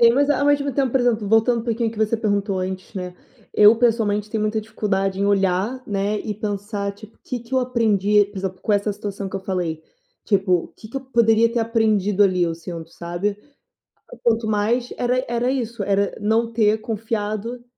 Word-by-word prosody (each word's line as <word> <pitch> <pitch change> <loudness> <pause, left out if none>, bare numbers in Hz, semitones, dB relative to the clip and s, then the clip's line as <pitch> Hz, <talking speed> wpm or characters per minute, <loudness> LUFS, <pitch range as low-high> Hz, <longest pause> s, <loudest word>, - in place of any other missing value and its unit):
Sim, 235 0 +7
mas 285 +3 +2
ao 285 - +2
ao 285 - +2
mesmo 285 -1 +2
tempo, 265 -2 +1
por 265 - +3
exemplo, 225 -4 +1
voltando 225 +2 +3
um - - -9
pouquinho 230 -1 0
o - - -6
que 220 - -10
você 220 +1 +1
perguntou 205 -3 0
antes, 185 +2 -5
né, 180 -1 -5 0.4
eu 210 +2 +7
pessoalmente 215 -3 +1
tenho 220 - -1
muita 215 +1 0
dificuldade 195 -3 -2
em 200 - +2
olhar, 200 +5 +1
né, 205 +1 -1
e 215 - -3
pensar 205 -1 -3
tipo: 215 +2 -15
"Que 245 -2 -4
que 235 +2 -17
eu 260 - +3
aprendi 210 -5 +3
por 205 -1 -9
exemplo, 185 -1 -4
com 215 - 0
essa 205 +1 +1
situação 200 -1 -5
que 190 - -11
eu - - -5
falei?". 175 -4 -3 0.4
Tipo, 195 -3 +1
o 175 - +2
que 215 - -14
que 270 - -7
eu - - -2
poderia 230 -3 +3
ter 240 - 0
aprendido 215 -3 +2
ali 185 -3 +3
assim, 165 +2 -5 0.2
sabe. 175 +5 -3 0.9
Quanto 230 -1 +2
mais 225 +4 0
era 250 +1 +1
era 240 +1 0
isso, 235 -4 -3
era 200 0 +1
não 225 +2 +1
ter 215 -1 +3
confiado 225 +1 -3
215 Hz, 205 wpm, -22 LUFS, 200-230 Hz, 0.9 s, Sim